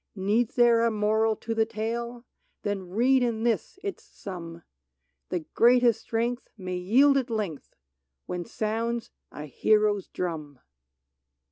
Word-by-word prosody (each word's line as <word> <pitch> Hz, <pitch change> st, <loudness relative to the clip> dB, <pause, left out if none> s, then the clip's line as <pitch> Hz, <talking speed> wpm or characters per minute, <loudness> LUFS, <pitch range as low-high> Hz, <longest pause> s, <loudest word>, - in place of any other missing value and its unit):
Needs 210 Hz, +4 st, 0 dB
there 235 Hz, -2 st, +5 dB
a 230 Hz, -, +3 dB
moral 220 Hz, +1 st, +1 dB
to 225 Hz, +2 st, -4 dB
the 225 Hz, 0 st, +1 dB
tale? 235 Hz, +2 st, -4 dB, 0.4 s
Then 195 Hz, -3 st, -3 dB
read 250 Hz, +7 st, +3 dB
in 230 Hz, -2 st, 0 dB
this 230 Hz, -, -1 dB
its 410 Hz, +3 st, -5 dB
sum: 170 Hz, -, -9 dB, 0.7 s
The 180 Hz, -, -1 dB
greatest 240 Hz, -1 st, +4 dB
strength 235 Hz, +2 st, -2 dB
may 185 Hz, -2 st, -4 dB
yield 260 Hz, +10 st, +4 dB
at 260 Hz, -2 st, -1 dB
length, 205 Hz, -10 st, -4 dB, 0.5 s
When 180 Hz, -1 st, -4 dB
sounds 230 Hz, +2 st, -2 dB, 0.2 s
a 150 Hz, -, -7 dB
hero's 210 Hz, -, +2 dB
drum 155 Hz, -6 st, -5 dB
220 Hz, 130 wpm, -27 LUFS, 190-235 Hz, 0.7 s, there